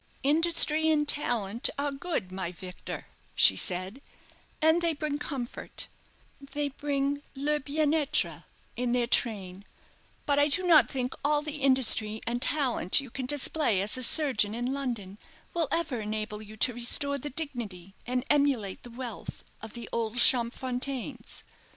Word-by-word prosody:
"Industry 315 +1 +5
and 300 -2 +1
talent 235 -6 0
are 285 0 -1
good, 275 - -4
my 185 -2 -4
Victor," 180 0 -8 0.3
she 95 - +6
said, 185 - -2 0.6
"and 320 +2 +3
they 335 -2 0
bring 295 -1 -3
comfort, 260 -5 -6 0.5
they 285 +1 -4
bring 285 0 -2
le 295 +2 -1
bienêtre 295 +1 -1 0.3
in 245 0 -1
their 245 -1 +1
train; 200 -6 -1 0.6
but 285 -1 +2
I 290 - +4
do 360 +5 +4
not 335 -3 +6
think 255 -2 -3
all 295 +1 +1
the 300 0 -5
industry 230 -5 +3
and 240 +1 -2
talent 265 - +2
you 270 -4 -8
can 260 0 -5
display 290 -5 +1
as 200 +2 +1
a 255 - -2
surgeon 245 -6 +5
in 245 +2 -2
London 230 -8 -5 0.3
will 335 -3 0
ever 305 -8 -1
enable 215 0 -4
you 215 0 -12
to 245 - +1
restore 280 +4 +1
the 295 - -6
dignity 235 - -4
and 250 +1 -2
emulate 275 -10 +1
the 245 - -12
wealth 240 -2 -8 0.2
of 220 0 -9
the 235 -1 -8
old 230 0 -2
Champfontaines." 250 +1 0
260 Hz, 150 wpm, -28 LUFS, 220-290 Hz, 0.6 s, she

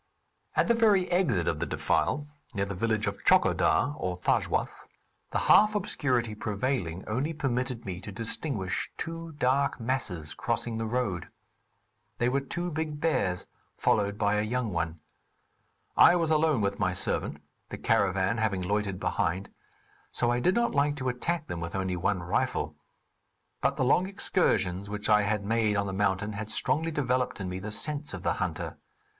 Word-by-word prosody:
At - - +3
the 235 - +5
very 210 -5 +4
exit 140 - +2
of - - 0
the - - -1
defile, 145 +2 0 0.3
near 100 -1 0
the 100 - -5
village 110 +2 0
of 100 -1 -4
Tchokodar, 135 - +4
or 90 -1 -2
Thajwas, - - 0 0.4
the - - -1
half 210 +1 +5
obscurity 125 - 0
prevailing 105 -4 -2
only 130 +9 -1
permitted 125 -4 -2
me 95 -2 -5
to 100 - -7
distinguish 110 -1 -2
two 165 0 -5
dark 140 0 +1
masses 105 - -2
crossing 115 - -2
the 115 - -2
road. 110 -8 -1 0.9
They 120 - +2
were 140 +2 +1
two 175 +5 -4
big 155 -1 -3
bears 95 - 0 0.3
followed 100 -1 +1
by 105 0 +2
a - - +2
young 115 -1 -1
one. 85 -1 -2 0.9
I 175 - +7
was 165 -2 +1
alone 155 -5 +3
with 100 0 -1
my 95 -3 +1
servant 95 - -1 0.3
(the - - -6
caravan 95 +3 +1
having 100 -4 0
loitered 100 0 -1
behind), 95 +4 -1 0.6
so 120 -1 +1
I 120 - +1
did 180 +10 +2
not 235 0 +1
like 145 +1 +2
to 130 -3 -2
attack 160 +6 -1
them 85 - -5
with 85 +1 -5
only 95 -1 -1
one 90 +1 0
rifle; 85 - -1 0.9
but - - +1
the 130 - +1
long 180 +8 +3
excursions 100 - +1
which 105 +1 -3
I 105 -1 +6
had 105 0 -1
made 110 -1 +2
on 100 0 +1
the 95 - -4
mountain 100 +1 0
had 105 +1 -5
strongly 160 +8 +1
developed 130 -6 0
in 95 - -3
me 90 +1 -4
the 105 +3 -6
sense 150 +6 +1
of - - -9
the - - +2
hunter. - - -3
110 Hz, 170 wpm, -28 LUFS, 100-145 Hz, 0.9 s, I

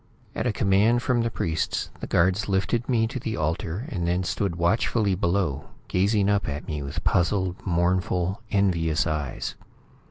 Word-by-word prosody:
At - - -1
a - - +2
command 105 +5 +3
from 125 -2 +2
the 115 - 0
priests, 80 -7 -2
the - - -5
guards 95 +4 +2
lifted 110 +6 0
me 115 -3 +3
to 125 +3 -4
the 115 -2 -3
altar 80 - -2
and 90 - -2
then 90 +2 +1
stood 95 -1 -1
watchfully 100 +4 +1
below, 85 -6 0 0.2
gazing 100 +2 +2
up 100 -5 +1
at 75 +5 -5
me 75 -4 -3
with 70 0 -5
puzzled, 90 +1 +1
mournful, 90 +3 +1
envious 85 -7 +2
eyes. 75 -4 -3
95 Hz, 160 wpm, -25 LUFS, 85-105 Hz, 0.2 s, command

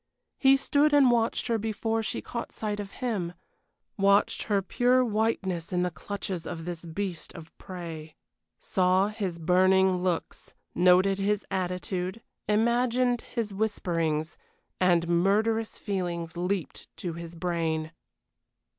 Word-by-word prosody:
He 270 0 +6
stood 290 +2 +3
and 270 -4 +6
watched 230 -1 +1
her 230 -2 0
before 225 +1 -1
she 220 - -3
caught 235 - -5
sight 210 -1 -3
of 200 -1 -5 0.2
him 185 -8 -1 0.7
watched 200 +1 +3
her 200 -2 +2
pure 250 +5 +3
whiteness 205 -6 -1
in 180 -1 +1
the 180 - -1
clutches 180 +1 -5
of 165 -1 -6
this 175 -1 -5
beast 180 +1 -4
of 165 -1 -11
prey. 165 -4 -8 0.4
Saw 185 +2 +2
his 200 -5 -3
burning 185 +2 +4
looks; 180 -2 -3 0.2
noted 185 +2 +4
his 205 +1 0
attitude; 185 +2 -2 0.3
imagined 240 +3 +2
his 225 -4 -4
whisperings 170 -7 -1 0.4
and 175 -2 +3
murderous 210 +6 +1
feelings 175 -4 -3
leaped 180 0 -3
to 175 -2 -4
his 170 0 -8
brain. 165 -2 -1
190 Hz, 130 wpm, -28 LUFS, 170-220 Hz, 0.7 s, He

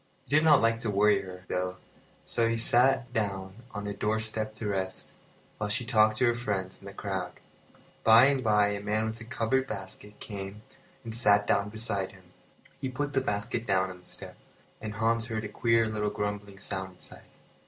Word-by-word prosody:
He 145 - 0
did 155 - +5
not 150 -6 +6
like 115 0 +3
to 115 - 0
worry 105 +1 +4
her, 90 -1 -10
though, 90 0 -2 0.5
so 115 -1 +1
he 115 - 0
sat 120 +2 +3
down 95 -2 -2
on 105 -2 -6
a 100 - -3
doorstep 110 +1 -1
to 110 -1 -4
rest, 95 -2 -2 0.5
while 105 -1 -1
she 120 +3 0
talked 110 -3 +4
to 130 - +3
her 120 - +4
friends 100 -6 -3
in - - -15
the - - -7
crowd. 95 -3 -3 0.7
By 115 +3 +8
and 135 -2 +2
by 105 -2 +4
a 100 0 -3
man 105 +2 0
with 110 +1 -5
a - - -8
covered 130 +2 0
basket 105 +1 -7
came 100 0 -7 0.4
and 115 - -6
sat 105 -3 +4
down 100 0 +2
beside 105 -3 -3
him. 95 -1 -17 0.6
He 135 -1 -2
put 145 +3 -3
the 135 - +3
basket 115 0 -2
down 95 -1 +2
on 90 - -11
the 90 - -16
step, - - -6 0.4
and 105 -1 -5
Hans 115 +1 +1
heard 110 -2 -3
a - - -3
queer 115 +2 +2
little 105 -1 -1
grumbling 105 -1 -4
sound 95 -1 -4
inside. - - -10
105 Hz, 195 wpm, -29 LUFS, 100-115 Hz, 0.7 s, By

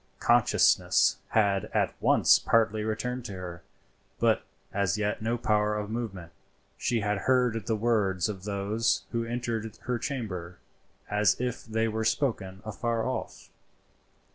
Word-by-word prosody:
Consciousness - - +4
had 100 -3 +2
at - - +2
once - - +5
partly 110 -1 +2
returned 125 +3 -3
to 100 - -6
her, 90 -2 -7 0.6
but - - +2 0.3
as 100 -1 +1
yet 105 0 -1
no 115 +2 0
power 105 -1 +1
of 105 0 -4
movement. 100 -8 -5 0.4
She 120 -2 0
had 105 -1 0
heard 125 -5 +2
the 115 - +1
words 105 -5 +1
of 95 -3 -6
those 105 +3 0
who 115 -1 -1
entered 115 -2 -3
her 125 -1 -1
chamber 95 -10 -4 0.5
as 105 0 +2
if 125 -1 -3
they 110 0 0
were 110 0 -2
spoken 110 -5 -1
afar 115 +1 -2
off. 130 -3 -5
110 Hz, 140 wpm, -28 LUFS, 100-115 Hz, 0.6 s, once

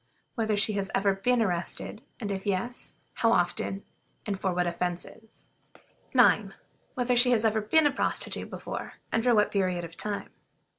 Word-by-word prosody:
Whether 220 -4 0
she 210 +1 +2
has 195 -1 -2
ever 195 0 +3
been 235 +5 +2
arrested, 185 +3 -1 0.2
and 205 -4 -3
if 195 0 -4
yes, 205 +6 -2 0.2
how 230 - +2
often, 190 0 0 0.4
and 200 -2 -3
for 190 - 0
what 180 0 0
offenses? 180 +5 -5 0.7
9. - - +4 0.4
Whether 250 0 +1
she 245 +1 +5
has 230 -2 +3
ever 220 0 +2
been 305 +9 +3
a 290 - +4
prostitute 275 - -1
before, - - -6 0.2
and 225 - +1
for 245 -1 +4
what 210 -1 +3
period 185 -3 0
of 165 0 -11
time? 205 +2 -3
210 Hz, 165 wpm, -28 LUFS, 190-230 Hz, 0.7 s, she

